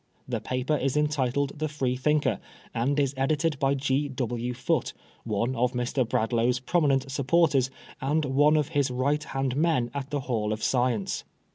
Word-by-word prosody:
The - - -2
paper 130 +4 -1
is 135 0 0
entitled 140 -1 0
the 155 - 0
Freethinker^ 135 -3 0 0.3
and 135 +5 +1
is 140 -1 +1
edited 150 +2 +1
by 135 0 +2
G. 140 +1 0
W. 125 -2 -2
Foote, 125 +1 -1 0.3
one 115 +4 -1
of 125 +1 +1
Mr. 125 0 -1
Bradlaugh's 120 +2 +1
pro 170 +7 +1
minent 135 -2 +1
supporters, 140 -1 +2 0.3
and 145 +3 +1
one 145 +3 +4
of 150 -2 0
his 145 -4 +1
right 140 +4 0
hand 135 -3 -2
men 145 -6 +1
at 140 -1 -4
the 145 -1 -2
Hall 110 -5 -1
of 110 - -5
Science." 120 -5 0
135 Hz, 165 wpm, -27 LUFS, 125-145 Hz, 0.3 s, one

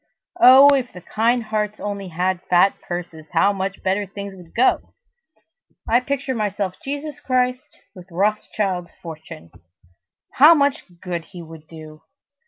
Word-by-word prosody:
Oh, 270 -2 +8
if 260 -3 -1
the 180 - -11
kind 230 +6 0
hearts 215 -1 -3
only 200 -2 -5
had 180 +1 -2
fat 180 +2 +4
purses, 170 -3 -7
how 200 +1 +3
much 195 0 -5
better 195 +2 -1
things 200 0 -8
would 175 -3 -16
go! 250 +3 +1 0.9
I 235 +2 +4
picture 275 +1 -3
myself 205 -4 -2
Jesus 285 +1 -5
Christ 250 0 -2 0.2
with 180 -3 -13
Rothschild's 190 -1 -2
fortune! 155 - -10 0.8
How 305 +5 +7
much 280 -2 0 0.2
good 175 -3 -5
he 175 -3 -11
would 160 -1 -13
do! 155 -1 -12
200 Hz, 140 wpm, -21 LUFS, 175-250 Hz, 0.9 s, Oh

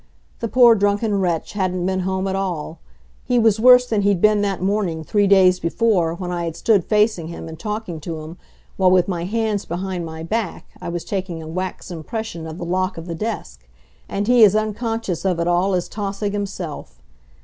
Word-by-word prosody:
The 230 - -2
poor 240 0 +6
drunken 205 0 +1
wretch 175 -4 -1
hadn't 185 -3 -1
been 190 0 0
home 190 +1 -1
at 190 - -1
all. 170 -4 -3 0.4
He 245 - +1
was 225 -2 +3
worse 250 +1 +7
than 220 -4 0
he'd 200 -2 +2
been 210 +1 +4
that 200 -2 -1
morning 185 -4 -1
three 205 +5 +2
days 185 -2 +5
before, 170 -2 +1
when 180 0 -5
I 175 -1 -2
had 165 -1 -4
stood 205 -6 +2
facing 210 -6 +2
him 170 -1 -7
and 160 -1 -9
talking 210 -4 -4
to 160 0 -6
him, 160 +3 -9 0.4
while 185 -1 +4
with 180 -1 +4
my 175 -3 -2
hands 215 0 -1
behind 180 +1 -4
my 160 0 -7
back 215 +2 -3 0.2
I - - -5
was 170 -1 -4
taking 185 -5 -4
a - - -9
wax 185 +3 -5
impression 170 0 -5
of 160 0 -7
the 175 - -5
lock 185 +2 -1
of 165 - -7
the 170 - -5
desk; 215 +7 -5 0.4
and 200 +1 -2
he 245 -1 +6
as 205 -1 +6
unconscious 215 -3 -2
of 185 -3 0
it 170 - 0
all 180 +2 +2
as 180 - -1
Tausig 200 0 -3
himself. 180 - -5
190 Hz, 205 wpm, -21 LUFS, 170-210 Hz, 0.4 s, worse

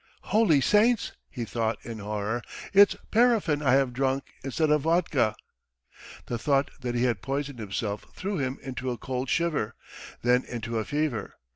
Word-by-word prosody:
"Holy 210 -10 +5
saints," 210 - +3 0.2
he 120 -4 -5
thought 115 0 -1
in 115 -2 -6
horror, 105 +3 -2 0.3
"it's 200 +1 +7 0.2
paraffin 220 -10 +3
I 130 -4 +3
have 135 -2 +3
drunk 135 +2 0 0.2
instead 150 +3 0
of 150 -1 +4
vodka." 160 -8 +2 0.9
The 120 - -3
thought 140 +3 +1
that 125 -2 -3
he 120 - +1
had 120 -6 +1
poisoned 140 +3 -3
himself 105 0 -3
threw 195 -2 -3
him 130 -1 -2
into 130 -1 -4
a 120 - -2
cold 130 +1 -3
shiver, 150 -10 0 0.5
then 125 +1 +4
into 115 -1 -3
a 110 - -3
fever. 145 -7 -2
130 Hz, 160 wpm, -27 LUFS, 120-155 Hz, 0.9 s, it's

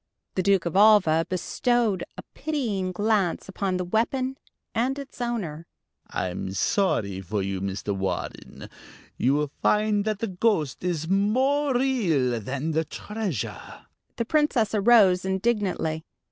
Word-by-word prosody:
The 185 - 0
Duke 195 -2 +2
of 170 - -3
Alva 195 -6 +5
bestowed 215 +2 0
a - - -7
pitying 225 -12 -2
glance 205 -2 0
upon 195 -1 -2
the 180 - -2
weapon 255 +7 0 0.4
and 250 +4 0
its 275 -3 -9
owner. 180 -10 -3 0.4
"I'm 95 +1 -3
sorry 100 - 0
for 100 +2 -2
you, 95 -1 -3
Mr. 100 +1 -3
Warren. 95 -2 -4 0.5
You 135 +3 +2
will 150 -1 -1
find 210 -1 +2
that 215 -2 0
the 230 - -2
ghost 180 - 0
is 165 -3 -1
more 260 - +2
real 175 - +1
than 135 +8 -3
the 160 +1 +1
treasure." 205 - -5 0.3
The 235 - -2
Princess 260 -6 +2
arose 200 -4 +5
indignantly. 190 -5 -1
190 Hz, 130 wpm, -25 LUFS, 155-225 Hz, 0.5 s, Alva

